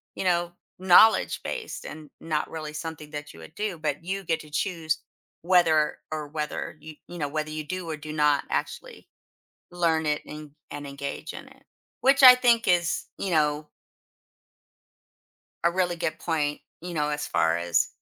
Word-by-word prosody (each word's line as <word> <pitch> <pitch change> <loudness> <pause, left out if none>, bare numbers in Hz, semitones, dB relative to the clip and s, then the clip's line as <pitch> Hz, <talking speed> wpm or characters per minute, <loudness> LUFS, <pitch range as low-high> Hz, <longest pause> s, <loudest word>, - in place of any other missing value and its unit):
you - - -3
know, 175 -1 +1 0.3
knowledge-based 220 - +3
and 155 -2 -9
not 155 -2 -2
really 155 -2 -6
something 150 -1 -7
that 145 -1 -7
you - - -14
would 80 - -12
do. 205 -4 -3
But 150 0 -2
you 195 +3 -3
get 165 -2 0
to 150 - -14
choose 160 -1 -1 0.4
whether 165 -4 +3
or 155 -1 -4
whether 150 +1 -4
you 155 0 -10
you 175 - -9
know 145 - -1
whether 155 +1 -3
you 155 0 -4
do 185 +3 -5
or 155 - -2
do 155 0 -8
not 150 -2 +3
actually - - -4 0.6
learn 165 -2 +1
it 150 0 0
and 150 -1 -9 0.2
and 145 -1 -6
engage 140 +3 -6
in - - -9
it, 265 +1 -21 0.4
which 275 +1 +4
I 250 -1 +12
think 240 -2 +3
is, 175 -2 +1
you 195 - -3
know 150 -1 +1 2.0
a 170 - +4
really 175 -1 0
good 160 -1 -3
point, 150 -3 -1 0.2
you 175 0 -6
know, 150 -2 0
as 150 0 -2
far 85 0 +2
as 85 -1 +1
155 Hz, 170 wpm, -26 LUFS, 150-175 Hz, 2.0 s, I